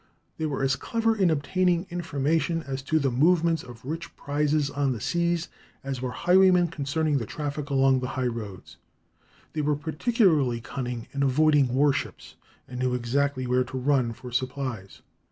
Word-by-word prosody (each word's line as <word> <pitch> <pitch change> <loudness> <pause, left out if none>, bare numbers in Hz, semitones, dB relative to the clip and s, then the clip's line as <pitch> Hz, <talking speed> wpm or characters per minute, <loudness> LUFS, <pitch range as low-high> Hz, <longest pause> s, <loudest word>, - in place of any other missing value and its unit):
They 160 - 0
were 140 -2 -2
as 135 -1 +2
clever 225 - 0
in 190 -4 +3
obtaining 175 +4 +1
information 165 0 -1
as 135 -2 -4
to 155 +4 0
the 140 -4 +1
movements 165 +4 +3
of 120 -1 -13
rich 165 +4 -6
prizes 145 0 0
on 140 -2 0
the 115 - -6
seas 170 +6 0 0.4
as 135 -2 -4
were 130 - -2
highwaymen 180 +6 +4
concerning 150 -1 -1
the 115 - -5
traffic 145 +1 -4
along 135 -1 +3
the 125 - -3
highroads. 115 -7 -4 0.8
They 155 - -1
were 150 0 +1
particularly 155 - +1
cunning 120 -1 -5
in 140 - -2
avoiding 145 +1 +4
war 140 +1 +4
ships, - - -5 0.3
and 125 0 -7
knew 125 -1 +1
exactly 130 +2 0
where 125 +1 +2
to 130 +1 -7
run 130 -2 +1
for 125 +2 -10
supplies. 130 -5 -4
140 Hz, 165 wpm, -26 LUFS, 130-160 Hz, 0.8 s, highwaymen